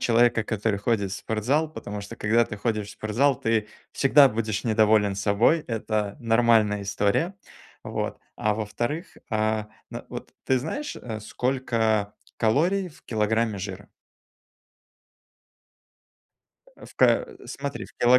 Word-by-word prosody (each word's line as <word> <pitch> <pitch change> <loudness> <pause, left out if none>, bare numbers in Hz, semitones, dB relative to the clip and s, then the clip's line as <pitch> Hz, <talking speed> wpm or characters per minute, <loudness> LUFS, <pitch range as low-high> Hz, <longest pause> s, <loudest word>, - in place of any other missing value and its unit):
человека, 115 -1 +3
который 105 -1 -1
ходит 100 -2 0
в - - -3
спортзал. 130 +9 0
Потому 105 -9 -6
что 100 +3 -9
когда 115 +2 +3
ты 105 - -7
ходишь 105 -1 -2
в - - -8
спортзал, 125 +7 +1
ты 110 -2 +1 0.2
всегда 140 +1 +6
будешь 110 -3 -2
недоволен 110 -3 +3
собой. 105 +11 +2
Это 110 -3 -2
нормальная 115 -3 +3
история. 105 - 0 0.5
Вот. - - -3 0.2
А 105 -1 +1
во-вторых, 120 - -3
э, 110 0 +1 0.3
ну - - -7
вот, - - -8
ты 130 - +3
знаешь, 285 - -4
э, 110 -3 -6
сколько 110 -3 0 0.2
калорий 170 - +2
в 155 - -19
килограмме 110 -1 0
жира? 100 +1 -6 2.9
В - - -14
ка - - +3
смотри, 140 0 -5
в - - -20
кило 125 +1 +6
110 Hz, 130 wpm, -25 LUFS, 105-125 Hz, 2.9 s, всегда